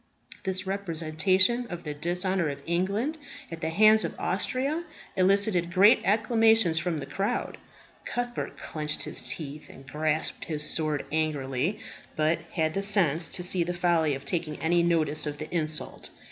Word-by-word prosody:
This 190 0 -2
representation 190 +5 +1
of 175 -4 -7
the 150 - -4
dishonour 175 +2 -1
of 140 0 -7
England 200 - -1 0.3
at 165 0 -7
the 160 - -1
hands 215 +5 +5
of - - -5
Austria 265 - -1 0.3
elicited 190 -2 +2
great 195 +4 +5
acclamations 225 -4 +3
from 170 -1 -2
the 145 - -5
crowd. 195 +1 -3 0.4
Cuthbert 245 0 -4
clenched 150 -1 -2
his - - -1
teeth 150 -1 -6
and 135 - -14
grasped 155 +2 -2
his 150 -2 0
sword 155 -1 +1
angrily, 155 +3 -1 0.4
but 155 +1 +1
had 160 -2 0
the 195 - -1
sense 185 -6 +4
to 180 - 0
see 180 0 +5
the 175 +1 -4
folly 170 -4 +1
of 135 +1 -9
taking 160 0 -3
any 170 +2 +1
notice 155 -3 +1
of 145 0 -4
the 155 - -8
insult. 155 -2 -3
170 Hz, 155 wpm, -27 LUFS, 155-195 Hz, 0.4 s, hands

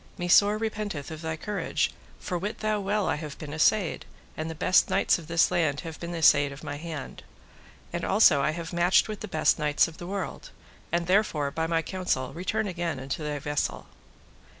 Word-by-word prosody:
me 175 - -3
sore 205 +4 +5
repenteth 210 -9 -4
of 160 0 -7
thy 160 -1 -3
courage, 205 +5 -1 0.3
for 180 - -4
wit 200 +5 -3
thou 215 -1 0
well 205 +1 0
I - - 0
have 150 -2 -7
been 150 -2 -7
assayed, 180 +4 +2 0.3
and 160 +1 -4
the 160 - -5
best 180 +4 +3
knights - - +2
of 160 - -12
this 170 0 +3
land 145 -4 +1
have 165 -2 -8
been 170 0 -5
assayed 145 -3 +5
of 140 - -10
my 145 - -5
hand; 155 -2 -7 0.7
and 170 - -3
also 185 -8 +5
I 140 - +2
have 165 +2 -5
matched 175 +2 +4
with 215 -1 -5
the 215 - -6
best 155 -4 +2
knights 150 +1 +3
of 165 - -12
the 175 - -7
world, 200 - -5 0.4
and 170 0 0
therefore 170 -7 +1
by 160 +2 -1
my 165 0 +1
counsel 165 -9 -2
return 205 +5 -2
again 170 -5 -3
unto 135 +4 -4
thy 150 -1 -2
vessel. 145 +1 -2
170 Hz, 200 wpm, -27 LUFS, 150-190 Hz, 0.7 s, sore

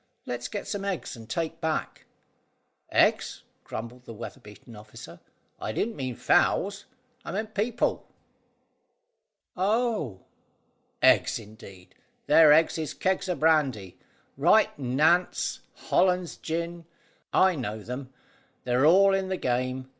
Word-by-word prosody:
"Let's 120 0 -4
get 205 - -6
some 205 -1 -4
eggs 195 -3 -3
to 115 -2 -11
take 160 +6 -3
back." 160 -1 -3 0.9
"Eggs!" - - +2 0.2
grumbled 120 +3 -8
the 115 - -9
weather 120 +4 -8
beaten 110 0 -14
officer; 105 +1 -12 0.4
"I 110 - -4
didn't 225 - -2
mean 130 -3 -4
fowls, 200 - +1 0.4
I - - -6
meant 215 +2 -4
people." 225 +3 -1 1.5
"Oh!" 200 - 0 0.8
"Eggs, - - +4
indeed! 100 -4 -13 0.3
Their 160 -2 +7
eggs 160 +2 +4
is 155 -1 -4
kegs 190 0 -1
o' 180 - 0
brandy. 140 - +1 0.4
Right - - +4
Nantes; 150 +8 +1 0.2
Hollands 180 -2 +1
gin. 170 +1 -4 0.5
I 190 0 +4
know 110 -8 -5
them. 125 +3 -7 0.5
They're 125 +3 +2
all 195 +4 +6
in 190 -1 0
the 190 - -1
game. 130 0 -2
155 Hz, 125 wpm, -27 LUFS, 120-185 Hz, 1.5 s, Their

